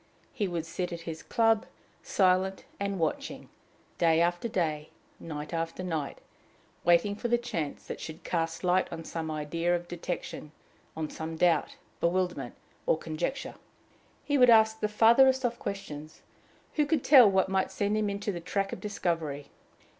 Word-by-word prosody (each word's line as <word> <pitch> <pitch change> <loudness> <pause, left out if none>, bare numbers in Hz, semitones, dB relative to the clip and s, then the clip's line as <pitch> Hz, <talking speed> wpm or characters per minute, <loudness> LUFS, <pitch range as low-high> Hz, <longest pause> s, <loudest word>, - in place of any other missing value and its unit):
He 210 -6 -1
would 170 -3 -3
sit 180 +2 -4
at 170 -1 -5
his 165 -1 -6
club, 225 -2 +2 0.3
silent 190 0 +1
and 200 -1 -2
watching, 160 -3 -3 0.5
day 165 -1 +4
after 175 +5 +1
day, 155 -7 -1 0.3
night 150 -1 -6
after 165 +2 -3
night, 160 -6 -3 0.7
waiting 175 +4 +4
for 225 - -3
the 240 0 +3
chance 170 -12 -4
that - - -6
should 160 +2 -8
cast 165 0 -2
light 180 +1 +2
on 165 -1 -6
some 160 0 -4
idea 165 +3 0
of 175 0 -4
detection, 170 -3 -5 0.4
on 160 -1 -2
some 160 0 -5
doubt, 170 0 +2 0.2
bewilderment, 175 -7 -1 0.3
or - - +4
conjecture. 165 - -3 0.7
He 285 -1 +1
would 250 -1 +7
ask 220 -1 +6
the 210 - +1
farthest 250 +5 +5
off 240 0 -1
questions: 155 -6 -7 0.5
who 300 -1 +3
could 305 -3 +1
tell 255 -7 +8
what 190 -1 +2
might 190 0 0
send 205 +1 -1
him 215 -1 +1
into 200 +1 -2
the 175 - -5
track 195 +3 -2
of - - -7
discovery? 165 -8 -2
180 Hz, 160 wpm, -29 LUFS, 165-210 Hz, 0.7 s, tell